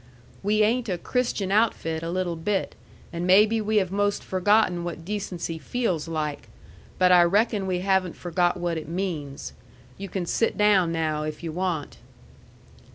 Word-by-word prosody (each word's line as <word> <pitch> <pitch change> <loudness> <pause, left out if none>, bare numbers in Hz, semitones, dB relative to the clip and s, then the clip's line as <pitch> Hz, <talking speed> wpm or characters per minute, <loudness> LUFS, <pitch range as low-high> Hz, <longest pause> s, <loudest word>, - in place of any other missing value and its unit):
"We 215 +2 +2
ain't 230 +2 +1
a 180 - -1
Christian 225 -2 -1
outfit 195 -7 +1
a 165 - -4
little 180 -1 -1
bit, 190 +5 -2 0.4
and 170 +1 -3
maybe 210 +4 +5
we 215 +1 0
have 190 -3 +1
most 205 +1 0
forgotten 185 -1 +2
what 170 -1 -6
decency 180 -5 -4
feels 175 - -2
like. 150 -7 -4 0.5
But 180 0 +4
I 180 -1 +8
reckon 200 +3 +2
we 180 -1 -1
haven't 190 -2 +1
forgot 175 +1 0
what 175 -2 -2
it 155 - -10
means. 150 - -4 0.5
You 195 0 -6
can 180 0 -3
sit 225 +6 0
down 200 -5 +4
now, 155 -2 -1
if 155 +2 -5
you 165 - -3
want." 170 -3 -3
180 Hz, 160 wpm, -25 LUFS, 165-205 Hz, 0.5 s, I